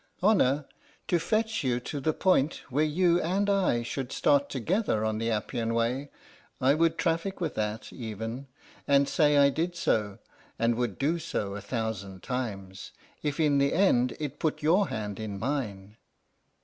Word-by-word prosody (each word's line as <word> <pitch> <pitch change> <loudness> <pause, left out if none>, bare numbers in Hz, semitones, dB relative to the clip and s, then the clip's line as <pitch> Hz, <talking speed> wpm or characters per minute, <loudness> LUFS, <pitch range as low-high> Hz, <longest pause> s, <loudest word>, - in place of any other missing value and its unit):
Honour? 150 -9 +3 0.4
To 175 - +3
fetch 220 +4 0
you 125 -2 +1
to 145 +4 -5
the 155 +3 +1
point 160 -3 +1
where 145 +4 +2
you 170 +3 +3
and 195 +4 0
I 190 -12 +2
should 130 +1 -4
start 140 -1 +2
together 140 - 0
on 110 0 -1
the 115 +1 -1
Appian 115 +1 -1
Way, 125 +5 0 0.5
I 130 +2 +4
would 165 +1 +2
traffic 170 +4 -1
with 165 -4 -2
that, 105 +1 -3
even, 115 +3 -6 0.4
and 140 0 +4
say 150 -2 +3
I 140 0 +6
did 170 +4 -2
so, 105 -11 0 0.4
and 115 +1 +2
would 120 -4 -2
do 160 +5 0
so 105 -11 -3
a 105 - -6
thousand 100 -6 -4
times, 100 -7 -5 0.3
if 150 0 -2
in 145 -3 +3
the 140 0 +2
end 130 -10 +3
it 150 -3 -5
put 155 -1 -1
your 180 +6 +4
hand 105 -2 -4
in 105 -2 -4
mine. 105 -4 -3
135 Hz, 165 wpm, -28 LUFS, 110-165 Hz, 0.5 s, I